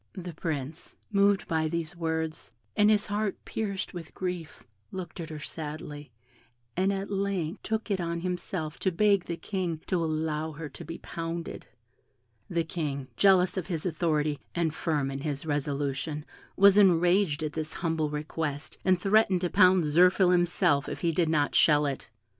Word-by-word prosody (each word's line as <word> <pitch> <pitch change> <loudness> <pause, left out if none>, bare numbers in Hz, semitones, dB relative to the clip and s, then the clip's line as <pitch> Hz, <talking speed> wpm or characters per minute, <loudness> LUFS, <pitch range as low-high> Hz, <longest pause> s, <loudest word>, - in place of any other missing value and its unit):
The 180 -3 -7
Prince, 155 -1 -5 0.2
moved 200 -1 +3
by 160 -2 +1
these 170 +1 -3
words, 160 -5 -3 0.2
and 210 0 +5
his 210 0 +4
heart 205 -1 -1
pierced 200 -3 -3
with 170 -3 -8
grief, 180 -4 -5 0.3
looked 185 -1 -7
at 165 -1 -5
her 155 - -6
sadly, 150 -2 -7 0.6
and 190 +2 +2
at 195 +1 -3
length 195 -3 -1
took 220 0 -2
it 190 -2 +1
on 170 0 -2
himself 175 -3 -3
to 190 - +1
beg 200 +1 +3
the 170 - -4
King 175 -2 -3
to 175 -3 0
allow 155 0 -1
her 150 0 -7
to - - -10
be 165 +2 -7
pounded. 165 0 -5 0.8
The 170 -1 +1
King, 145 -5 -4
jealous 185 - +4
of 185 - -2
his 170 -4 -3
authority, 155 -3 0 0.2
and 165 -3 +1
firm 150 -6 -1
in 135 0 -5
his 145 0 -3
resolution, 145 0 -2 0.3
was 200 +1 +7
enraged 175 -3 +4
at 150 -1 -3
this 155 -1 -4
humble 160 -3 -1
request, 150 0 -4
and 185 -1 +3
threatened 195 -1 +3
to 180 - -1
pound 185 -1 +6
Zirphil 180 +4 +5
himself 175 -5 +2
if - - -6
he 170 -2 +2
did 165 0 +1
not 150 -2 +2
shell 150 -1 +5
it. 140 -4 -4
165 Hz, 165 wpm, -28 LUFS, 155-185 Hz, 0.8 s, was